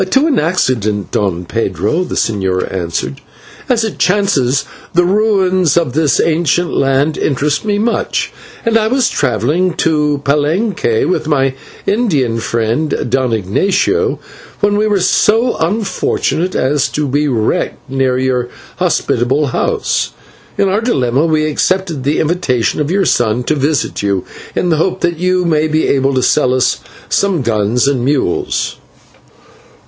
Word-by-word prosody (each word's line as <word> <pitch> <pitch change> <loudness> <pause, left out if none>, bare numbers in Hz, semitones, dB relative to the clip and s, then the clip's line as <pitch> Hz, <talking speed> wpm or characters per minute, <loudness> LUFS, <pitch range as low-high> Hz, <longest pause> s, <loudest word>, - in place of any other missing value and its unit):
"To 270 +7 +3
an 300 -6 +2
accident, 120 - 0
Don 90 -4 -1
Pedro," 110 - -1
the 180 - -5
señor 95 -5 -1
answered. 85 -7 -3 0.5
"As 235 -3 +2
it 220 - -4
chances, 145 -9 +1 0.3
the 175 - +5
ruins 185 -4 +2
of 165 -7 +1
this 150 -3 +2
ancient 165 +1 +1
land 135 +3 +1
interest 145 0 0
me 205 -1 +1
much, 230 +3 -1 0.3
and 225 0 +3
I 215 - +1
was 255 +1 +2
travelling 150 - 0
to 150 -3 +1
Palenque 150 - +1
with 170 -4 -1
my 135 -3 +1 0.3
Indian 150 - +1
friend, 115 +6 -1
Don 130 -2 +1
Ignatio, 190 - +1 0.4
when 205 0 +2
we 210 +1 +2
were 205 -2 +2
so 225 +6 +2
unfortunate 185 -1 -1
as 140 +1 +1
to 150 0 -2
be 145 +3 0
wrecked 115 -6 -1
near 130 -1 0
your 130 -1 0 0.3
hospitable 135 +5 +1
house. - - -1 0.4
In 200 - +2
our 200 +3 +1
dilemma 135 - +1
we 155 -1 +1
accepted 165 -1 -1
the 145 +3 0
invitation 150 -7 0
of 150 - -1
your 195 +2 +1
son 120 +1 +1
to 140 - 0
visit 145 -1 -1
you, 100 -2 -1 0.3
in 180 - 0
the 160 - +2
hope 175 +4 0
that 170 -1 0
you 180 0 +1
may 155 -2 +2
be 155 0 +1
able 135 0 +1
to 130 - +1
sell 130 -3 +2
us 130 - +1 0.3
some 190 -8 +1
guns 115 +3 +1
and 135 -4 0
mules." 135 -9 -1
150 Hz, 145 wpm, -14 LUFS, 125-185 Hz, 0.5 s, the